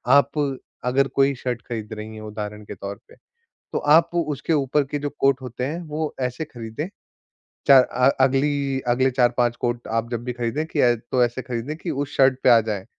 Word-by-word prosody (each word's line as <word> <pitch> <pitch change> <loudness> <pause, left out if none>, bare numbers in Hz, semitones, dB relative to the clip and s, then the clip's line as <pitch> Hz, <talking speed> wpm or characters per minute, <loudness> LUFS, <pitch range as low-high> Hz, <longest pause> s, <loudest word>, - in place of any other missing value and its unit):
आप 140 +1 +3 0.4
अगर 135 +2 +2
कोई 140 0 +2
शर्ट 125 -1 -3
खरीद 110 -2 -5
रही 110 0 -7
हैं, 110 - -9
उदाहरण 105 0 -6
के 105 - -8
तौर 100 +1 -6
पे, - - -16 0.6
तो - - 0
आप 165 +4 +4
उसके 155 -2 -1
ऊपर 145 -1 +2
के 145 +2 -4
जो 145 0 -3
कोट 135 -1 +3
होते 125 0 -4
हैं, 160 +5 -3
वो 155 +1 -3
ऐसे 125 +4 -2
खरीदें, 120 +2 -6 0.8
4 135 -3 +9
अ, 125 +2 +2
अगली 135 0 +1
अगले 130 +2 +3
4-5 120 -1 +2
कोट 120 0 -2
आप 115 +1 -1
जब 120 0 -3
भी 125 - -2
खरीदें 120 +5 -2
कि 160 - -3
ऐ 120 -1 +5
तो 120 +2 0
ऐसे 120 +2 -4
खरीदें 125 +3 -4
कि 170 0 -4
उस 145 0 -3
शर्ट 135 -1 +4
पे - - +6
आ 115 -1 +8
जाएँ। 105 -3 -4
130 Hz, 205 wpm, -23 LUFS, 120-140 Hz, 0.8 s, 4